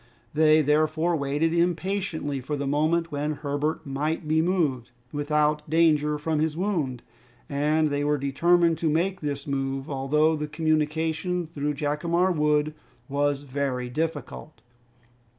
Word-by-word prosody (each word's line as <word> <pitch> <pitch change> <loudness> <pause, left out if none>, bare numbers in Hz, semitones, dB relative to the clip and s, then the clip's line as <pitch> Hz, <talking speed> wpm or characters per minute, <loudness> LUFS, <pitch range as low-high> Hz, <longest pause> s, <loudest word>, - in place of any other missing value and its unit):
They 155 0 +5
therefore 155 +3 +2
waited 150 +3 0
impatiently 170 -4 -1
for 145 +4 -3
the 140 - -3
moment 155 +4 +1
when 150 +1 -1
Herbert 145 +1 -2
might 150 +3 -2
be 160 +1 +3
moved 155 -9 0 0.2
without 150 +1 0
danger 150 -2 +3
from 155 +1 -1
his 155 0 0
wound, 160 - -1 0.4
and 150 +2 +1
they 145 0 -1
were 150 0 +1
determined 165 +5 +2
to 165 - +1
make 180 +5 0
this 145 -2 -3
move, 135 0 -3
although 150 +4 +2
the 150 0 -3
communication 160 +3 0
through 150 -1 -3
Jacamar 165 +5 +1
Wood 150 -1 +1 0.3
was 145 0 0
very 130 -3 -3
difficult. 155 0 -4
150 Hz, 135 wpm, -26 LUFS, 145-160 Hz, 0.4 s, They